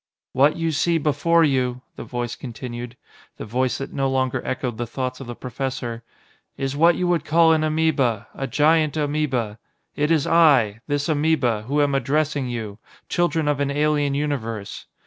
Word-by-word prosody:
"What 140 +4 +4
you 165 -1 -1
see 165 +3 +1
before 160 +3 +2
you," 130 -4 0
the - - -7
Voice 120 -1 -4
continued 120 0 -7 0.4
the - - -6
Voice 125 +3 0
that 135 - -6
no 135 -1 0
longer 130 -1 0
echoed 125 -3 -3
the 120 - -2
thoughts 130 +1 -4
of 135 - -8
the 120 - -6
professor 125 -2 -4 0.6
"is 135 0 -2
what 165 +3 +5
you 180 - -1
would 175 -3 +1
call 160 +1 +4
an 155 -1 +1
amoeba, 145 -8 +1
a 135 - -4
giant 155 +3 +2
amoeba. 140 -8 -1 0.4
It 150 +1 0
is 160 -4 +2
I 135 -10 +4
this 145 -1 -1
amoeba, 145 -8 +1
who 145 +2 +2
am 140 -1 0
addressing 140 0 0
you 110 -3 -5 0.3
children 170 -3 +1
of 145 -1 +1
an 140 -1 0
alien 145 -1 +1
universe. 115 -8 -4
140 Hz, 170 wpm, -22 LUFS, 125-155 Hz, 0.6 s, what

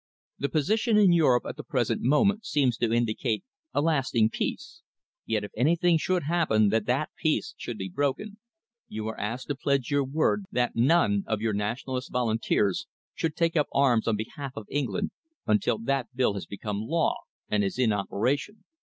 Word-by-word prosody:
The 140 - -1
position 215 - +2
in 195 -4 +6
Europe 135 -8 +4
at - - -6
the - - -6
present - - -1
moment 200 - +3
seems 135 -5 +1
to 115 -2 0
indicate 115 -1 0 0.3
a - - +1
lasting 130 -8 +2
peace, - - -4 0.5
yet 110 -2 0
if 105 - -7
anything 165 +6 +3
should 180 +1 0
happen 140 -10 +2
that 110 0 0
that 135 +5 0
peace 155 -2 0
should 120 - -6
be 95 - -4
broken, 145 - -2 0.5
you 110 0 -5
are 110 - -7
asked 115 +5 -3
to 145 - 0
pledge 140 -1 0
your 145 0 +3
word 155 +9 0
that 125 -1 0
none 115 -6 +3
of 110 -2 -1
your 110 0 0
Nationalist 125 +5 -3
volunteers 110 -5 0 0.3
should 160 -2 -2
take 165 0 +1
up 150 -3 +2
arms 125 -5 +3
on 115 - +2
behalf 130 +5 -6
of 110 - -7
England 130 -10 -1 0.3
until 105 +1 +2
that 125 +2 -1
bill 125 -5 +2
has 95 -5 -6
become 100 0 -4
law 160 +9 0 0.3
and 105 -1 +1
is 95 - -2
in 120 -4 +3
operation. 125 - -1
125 Hz, 175 wpm, -27 LUFS, 110-155 Hz, 0.5 s, in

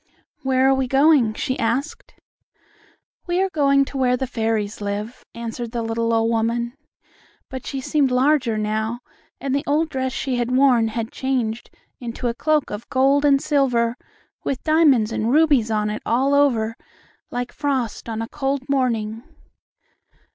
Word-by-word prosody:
"Where 265 0 +2
are 270 - +5
we 265 -1 0
going?" 270 -4 +4
she 260 - -2
asked. 245 +7 -2 1.1
"We 350 +1 0
are 385 0 +1
going 275 -3 +3
to 270 - -6
where 250 -1 +2
the 265 - -2
fairies 220 -4 -2
live," 205 +4 -4
answered 235 0 -6
the 235 -1 -2
little 230 0 -1
old 225 0 +2
woman, 235 +1 0 0.8
but 260 -1 -7
she 270 -2 -4
seemed 280 0 +1
larger 255 -2 +2
now, 220 +3 -2 0.4
and 270 -1 -2
the 280 +1 0
old 305 +3 +1
dress 260 -2 -2
she 260 -1 -2
had 240 0 -1
worn 255 -3 +4
had 225 0 -4
changed 240 -4 -2 0.3
into 240 0 -4
a 235 - 0
cloak 300 +3 0
of 205 +2 -7
gold 275 +2 +3
and 280 -1 +4
silver 250 -6 +1 0.5
with 265 - -3
diamonds 295 -9 +4
and 225 +1 -1
rubies 285 -6 +4
on 210 -1 0
it 215 - -5
all 265 +4 +1
over, 235 -6 +2 0.5
like 245 0 -4
frost 265 -6 -2
on 225 0 -3
a - - -5
cold 270 -1 -2
morning. 230 -5 0
250 Hz, 160 wpm, -22 LUFS, 225-275 Hz, 1.1 s, are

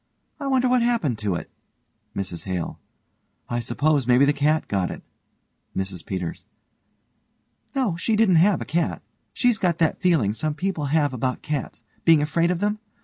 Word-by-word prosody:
I 280 - -3
wonder 260 -2 +3
what 250 0 +3
happened 225 - +1
to 105 -4 -1
it. - - -6 0.6
MRS 90 -4 -4
HALE: 90 -3 -3 0.7
I 120 - -1
s'pose 140 +2 +1
maybe 125 +2 +5
the 145 - +3
cat 150 +2 +1
got 95 -3 0
it. - - -7 0.7
MRS 95 -3 -3
PETERS: 90 -3 -4 1.3
No, 250 -10 +1
she 220 +5 0
didn't 210 -5 +4
have 190 +4 +4
a - - -3
cat. 165 +2 -1 0.3
She's 245 -4 +2
got 175 -3 +1
that 165 -3 +1
feeling 160 - +3
some 145 +7 -2
people 180 -4 -2
have 145 -1 +1
about 130 +1 -2
cats 145 -5 -4 0.2
being 160 -3 +5
afraid 165 +3 +1
of 180 0 -1
them. 210 +1 0
155 Hz, 165 wpm, -24 LUFS, 120-185 Hz, 1.3 s, maybe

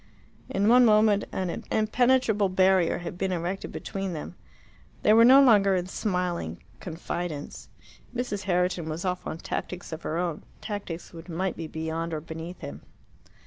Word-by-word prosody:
In 200 +2 +1
one 250 +2 +7
moment 215 -2 +4
an 185 -2 -3
impenetrable 220 -2 +2
barrier 185 -2 +3
had 175 0 -7
been 190 -1 0
erected 180 +2 -3
between 195 -2 -4
them. 155 +1 -6 0.7
They 210 - +6
were 225 +1 +7
no 265 +3 +8
longer 200 -6 +5
in 180 -1 -1
smiling 180 - -2 0.2
confidence. 170 -2 -5 0.5
Mrs. 225 -6 -3
Herriton 180 -3 0
was 160 +4 -4
off 180 -1 -2
on - - -4
tactics 180 +1 -5
of 160 0 -5
her 160 - -3
own 170 -3 -2 0.2
tactics 200 -6 -6
which 165 +2 -11
might 180 +2 -2
be 165 - -5
beyond 160 +1 -3
or - - -2
beneath 165 +3 -8
him. 70 +1 -7
180 Hz, 155 wpm, -27 LUFS, 165-205 Hz, 0.7 s, no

